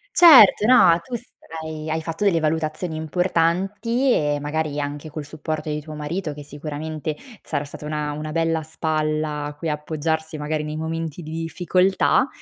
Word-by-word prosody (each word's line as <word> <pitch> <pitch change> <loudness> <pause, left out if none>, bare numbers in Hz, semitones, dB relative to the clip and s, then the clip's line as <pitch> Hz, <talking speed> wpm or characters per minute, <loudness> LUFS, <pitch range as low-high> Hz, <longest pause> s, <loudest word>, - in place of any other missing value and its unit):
Certo, 265 - +8
no, 190 -9 +6
tu 250 - -7
sarai 160 -9 -7
hai 160 +1 -1
fatto 165 +4 -3
delle 180 -5 +3
valutazioni 155 +1 -1
importanti 190 - +1
e 145 -7 +1
magari 150 0 -2
anche 145 +2 -5
col 150 0 -6
supporto 155 +1 -5
di 150 0 -2
tuo 155 +1 -9
marito, 150 +2 -4
che 145 - -9
sicuramente 150 +1 -5 0.3
sarà 145 -2 -3
stata 145 +1 -9
una 150 -1 -2
una 155 +1 -5
bella 165 0 0
spalla 155 -1 -1
a 145 - -6
cui 165 - -4
appoggiarsi, 160 +1 -2
magari 150 +1 -2
nei 150 0 -5
momenti 160 +1 -4
di 155 - -8
difficoltà, 180 - +1
155 Hz, 160 wpm, -22 LUFS, 150-165 Hz, 0.3 s, Certo